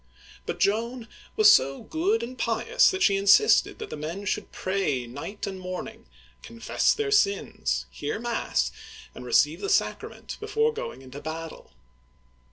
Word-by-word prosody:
But - - -4
Joan 230 +3 0 0.3
was 210 -1 +7
so 135 +1 +2
good 380 +8 0
and 255 +2 -6
pious - - +2
that 380 -1 -1
she 200 -1 +4
insisted 200 - +4
that 435 - -8
the - - -4
men 165 +7 -6
should - - -3
pray 185 -10 -1
night 145 - -7
and 190 -1 -6
morning, 185 +5 -7 0.3
confess 230 0 0
their 430 -1 -1
sins, 405 -1 +1
hear 440 - -4
mass, 150 - -1 0.4
and 125 - -10
receive 150 +6 +2
the - - -3
sacrament 410 - -1
before 450 0 0
going 465 - -7
into 135 +2 -10
battle. 160 +1 -7
205 Hz, 150 wpm, -26 LUFS, -, 0.4 s, was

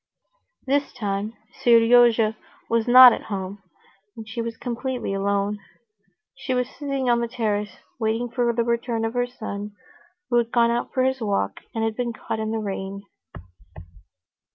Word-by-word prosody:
This 280 +1 0
time 210 -1 -3 0.3
Seryozha 230 -1 +5 0.3
was 230 0 0
not 250 0 +10
at - - -6
home, 195 0 -5 0.6
and 220 -1 -9
she 230 +1 -4
was 230 0 -5
completely 245 -2 -3
alone. 200 +1 -1 0.8
She 265 -1 -3
was 250 -1 0
sitting 275 -2 -4
on 240 -1 +3
the 235 - -1
terrace 210 -4 -2 0.2
waiting 225 +2 0
for 240 0 0
the 235 0 0
return 235 -1 -1
of 225 - -3
her 245 0 0
son, 210 -4 -7 0.6
who 240 - +4
had 235 -1 +1
gone 235 -1 +3
out 240 +1 -2
for 260 - +1
his 260 -1 0
walk 200 - -1 0.2
and 225 -1 -1
been 240 -1 -2
caught 220 - -5
in 220 0 -2
the 225 - -1
rain. 200 -1 -5
230 Hz, 155 wpm, -23 LUFS, 210-245 Hz, 0.8 s, not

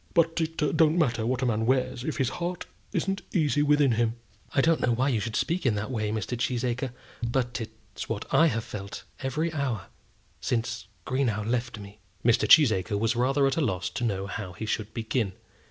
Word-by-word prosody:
"But 165 0 +3
it 160 0 -2
don't 160 +1 +3
matter 120 -8 +1
what 130 +1 0
a - - +3
man 110 -2 +1
wears 130 -1 +1
if 155 - -3
his 130 -4 +1
heart 175 +1 -2 0.3
isn't 195 0 -1
easy 150 -5 +2
within 145 -2 +4
him." 115 0 +1 0.4
"I - - +1
don't 160 +3 +4
know 120 - +2
why 130 +4 +2
you 120 -5 +1
should 110 +1 -3
speak 175 +3 0
in 120 -5 +2
that 110 +5 -3
way, 110 -4 -1
Mr. 110 +3 -2
Cheesacre; 125 0 -1 0.3
but 120 -1 -1
it's 110 - -9
what - - -2
I 165 - +6
have 115 -6 -1
felt 100 -2 -7 0.2
every 155 +5 -1
hour 130 - -2 0.5
since 120 -1 0
since 115 +1 -6 0.2
Greenow 120 -5 0
left 120 0 -1
me." 100 0 -11 0.3
Mr. 120 -1 +4
Cheesacre 110 - +6
was 115 +3 +1
rather 135 +4 +3
at 135 +2 +1
a - - +2
loss 95 - -1
to - - -4
know 100 -4 0
how 100 -2 -5
he 110 - -5
should 110 0 -2
begin. 110 -3 -1
120 Hz, 200 wpm, -27 LUFS, 110-145 Hz, 0.5 s, I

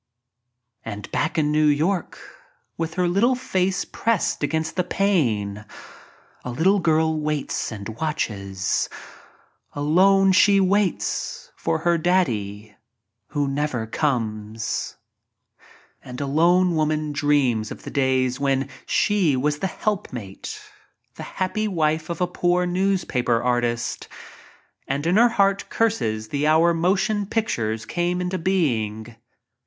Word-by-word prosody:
And 105 -2 -7
back 155 +3 -1
in 150 -1 +2
New 155 0 +3
York 160 +6 0 0.6
with 165 -1 -4
her 180 -1 +1
little 215 +9 +3
face 190 -5 -1
pressed 230 -5 -1
against 160 +2 -1
the 180 - +1
pane 120 - 0 0.8
a - - -5
little 185 +11 +2
girl 160 -2 +2
waits 150 -4 -2
and 100 -3 -7
watches 105 -7 -2 0.4
— - - -35
alone 190 +7 +4
she 200 +1 +5
waits 195 0 0
for 80 - -1
her 170 -1 +2
"Daddy" 110 - -1 0.5
who 145 -2 -1
never 135 -4 -1
comes. 110 -4 -2 1.1
a 125 - -10
lone 170 +7 +2
woman 155 -1 0
dreams 140 -7 +1
of - - -9
the - - -7
days 130 -2 +1
when 135 -1 0 0.2
she 190 -9 +2
was 150 +3 0
the 190 - 0
helpmate— 130 - -4 0.5
the - - -10 0.2
happy 215 +3 -1
wife 160 -4 0
of 170 - -4
a - - +4
poor 180 0 +1
news 185 +1 0
paper 120 -2 +1
artist 120 -1 -1 0.4
— - - -30
and 140 +3 -2
in 175 +4 +3
her 240 +2 +6
heart 200 -3 +1
curses 110 - 0
the 145 +1 0
hour 165 +2 +4
mo 175 +4 +2
tion 205 0 -1
pictures 115 - -1
came 175 +1 -1
into 180 +1 -2
being. 120 - -1
155 Hz, 130 wpm, -23 LUFS, 125-185 Hz, 1.1 s, her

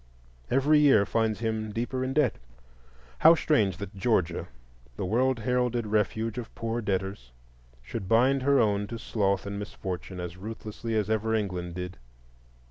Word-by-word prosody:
Every 145 +4 +4
year 135 -9 +5
finds 110 0 0
him 110 -1 -2
deeper 120 +4 -2
in 130 +1 -2
debt. 145 -4 +2 0.8
How 165 - +8
strange 105 - +2
that 100 +1 -7
Georgia, 95 -5 0 0.5
the - - -3
world 125 +6 +2
heralded 125 -1 0
refuge 110 +2 0
of 115 - -9
poor 115 +1 -2
debtors, 95 - -3 0.5
should 95 - -6
bind 130 +4 +4
her 140 +1 +4
own 105 -2 +2
to 115 - -5
sloth 100 -4 0
and 100 0 -4
misfortune 95 -2 -6
as 90 0 -6
ruthlessly 110 +2 -5
as 105 -3 +1
ever 110 +1 0
England 90 -5 -3
did! 90 -3 -6
110 Hz, 150 wpm, -28 LUFS, 100-120 Hz, 0.8 s, How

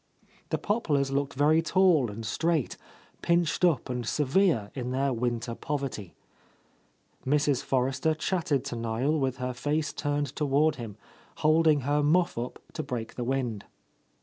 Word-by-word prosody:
The - - 0
pop 210 -2 -2
lars 140 -2 +2
looked 140 -1 -1
very 150 +4 +4
tall 165 - +3
and 110 +2 -7
straight, 160 +4 0 0.5
pinched 170 0 +1
up 165 -8 +3
and 125 -1 -3
severe 145 - +1
in 125 -2 -4
their 135 +1 0
winter 120 0 -2
poverty. 135 -8 -4 1.1
Mrs. 145 -1 +2
Forrester 135 +4 0
chatted 160 -4 -1
to - - -4
Niel 115 +7 0
with 130 -2 -1
her 125 -1 -3
face 150 +4 -1
turned 145 0 -2
toward 150 +1 +2
him, 110 -4 -7 0.5
holding 155 -1 +4
her 145 +3 +1
muff 170 +4 +2
up 120 +2 -4 0.2
to - - -3
break 115 -3 -5
the 125 - -4
wind. 120 -5 -2
140 Hz, 150 wpm, -28 LUFS, 125-155 Hz, 1.1 s, very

